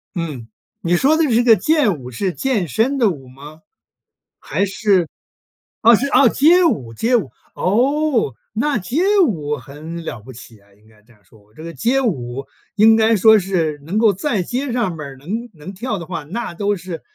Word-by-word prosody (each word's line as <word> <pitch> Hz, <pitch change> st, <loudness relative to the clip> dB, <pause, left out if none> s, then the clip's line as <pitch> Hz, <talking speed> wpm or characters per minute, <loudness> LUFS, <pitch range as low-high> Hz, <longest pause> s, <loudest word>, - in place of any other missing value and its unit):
嗯， 150 Hz, -10 st, -5 dB, 0.3 s
你 175 Hz, +1 st, +1 dB
说 280 Hz, -, +3 dB
的 325 Hz, -, +2 dB
这 240 Hz, -3 st, +2 dB
个 230 Hz, -3 st, +6 dB
健 230 Hz, -, +1 dB
舞 125 Hz, 0 st, -9 dB
是 185 Hz, -, -2 dB
健 200 Hz, -, -1 dB
身 240 Hz, -, 0 dB
的 230 Hz, -5 st, +3 dB
舞 135 Hz, -7 st, -7 dB
吗？ 145 Hz, +5 st, -13 dB, 0.8 s
还 200 Hz, -, -1 dB
是 195 Hz, -3 st, +1 dB, 0.7 s
啊 230 Hz, +1 st, +7 dB
是 275 Hz, +6 st, -1 dB
啊， 270 Hz, 0 st, +5 dB
街 340 Hz, +9 st, +4 dB
舞 125 Hz, -, -1 dB
街 235 Hz, -, +1 dB
舞。 230 Hz, -, 0 dB, 0.3 s
哦！ 250 Hz, -, +1 dB, 0.2 s
那 275 Hz, +6 st, 0 dB
街 235 Hz, -, -2 dB, 0.3 s
舞 150 Hz, -, -3 dB
很 155 Hz, +6 st, -9 dB
了 115 Hz, -7 st, -6 dB
不 130 Hz, +4 st, -12 dB
起 115 Hz, -2 st, -14 dB
诶， 100 Hz, 0 st, -27 dB
应 110 Hz, +1 st, -26 dB
该 110 Hz, -1 st, -23 dB
这 120 Hz, -, -25 dB
样 105 Hz, -2 st, -29 dB
说。 105 Hz, +2 st, -24 dB
这 155 Hz, -, -11 dB
个 165 Hz, 0 st, -7 dB
街 240 Hz, -, 0 dB
舞 135 Hz, -, -3 dB, 0.3 s
应 220 Hz, +1 st, +6 dB
该 225 Hz, 0 st, +3 dB
说 220 Hz, +1 st, +6 dB
是， 170 Hz, -6 st, -2 dB
能 190 Hz, +6 st, -3 dB
够 220 Hz, -3 st, +4 dB
在 200 Hz, -2 st, -2 dB
街 255 Hz, +6 st, -3 dB
上 215 Hz, -9 st, -1 dB
边 145 Hz, -2 st, -7 dB
儿 135 Hz, -, -12 dB
能 220 Hz, -, -5 dB
能 165 Hz, +4 st, -10 dB
跳 215 Hz, +1 st, -4 dB
的 170 Hz, -, -7 dB
话， 165 Hz, -3 st, -5 dB
那 205 Hz, +4 st, -5 dB
都 205 Hz, +3 st, -1 dB
是 175 Hz, -2 st, -8 dB
185 Hz, 210 characters per minute, -19 LUFS, 145-235 Hz, 0.8 s, 啊